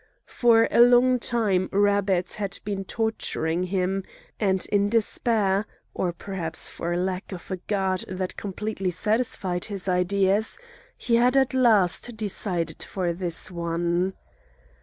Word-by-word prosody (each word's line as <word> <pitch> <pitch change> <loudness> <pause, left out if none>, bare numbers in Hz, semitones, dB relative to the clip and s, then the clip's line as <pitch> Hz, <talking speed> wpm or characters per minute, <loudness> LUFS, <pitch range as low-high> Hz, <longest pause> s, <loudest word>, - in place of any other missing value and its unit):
For 230 -2 +3
a - - +5
long 245 +1 +5
time 210 -6 0
Rabbet 200 -2 +1
had 200 -3 -3
been 200 -2 -3
torturing 180 -7 -1
him, 190 +1 -1 0.4
and 190 -3 +1
in 205 0 +2
despair, 215 -2 +1 0.3
or 180 - -1
perhaps 170 -2 -1
for 175 +1 -3
lack 185 +1 -3
of 185 0 -9
a 185 - -2
god 190 -1 -2
that 185 0 -4
completely 200 -1 -4
satisfied 195 -2 0
his 200 -3 -3
ideas, 190 +3 +2 0.4
he 235 -2 +1
had 250 +3 +3
at 265 -1 +2
last 225 -3 +3
decided 195 -4 -2
for 180 -3 -2
this 175 0 -3
one. 170 +2 -1
195 Hz, 130 wpm, -25 LUFS, 180-220 Hz, 0.4 s, a